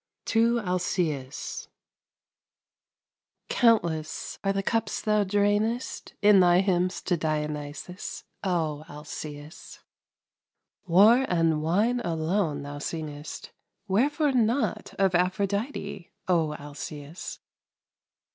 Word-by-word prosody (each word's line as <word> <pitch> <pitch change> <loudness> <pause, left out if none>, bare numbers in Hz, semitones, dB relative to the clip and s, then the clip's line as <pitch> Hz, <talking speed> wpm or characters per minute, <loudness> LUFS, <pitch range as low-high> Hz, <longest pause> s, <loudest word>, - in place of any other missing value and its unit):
TO 230 +1 +3
ALCÆUS 175 - -2 1.8
Countless 170 -10 +1
are 195 - +2
the 195 0 -1
cups 225 +1 0
thou 210 -1 +2
drainest 205 +5 0
In 205 -1 +7
thy 180 0 +6
hymns 185 -1 0
to 180 - +1
Dionysos, 150 +2 -4 0.2
O 160 -6 -1
Alcæus! 150 +1 -9 1.1
War 210 +9 +6
and 165 -3 +2
wine 210 +10 +2
alone 165 -5 -1
thou 145 0 -6
singest; 150 -1 -6 0.4
Whereforenot 260 - +1
of 195 -2 +2
Aphrodite, 195 +3 -1 0.2
O 165 -4 +2
Alcæus! 145 +2 -7
180 Hz, 85 wpm, -27 LUFS, 155-205 Hz, 1.8 s, In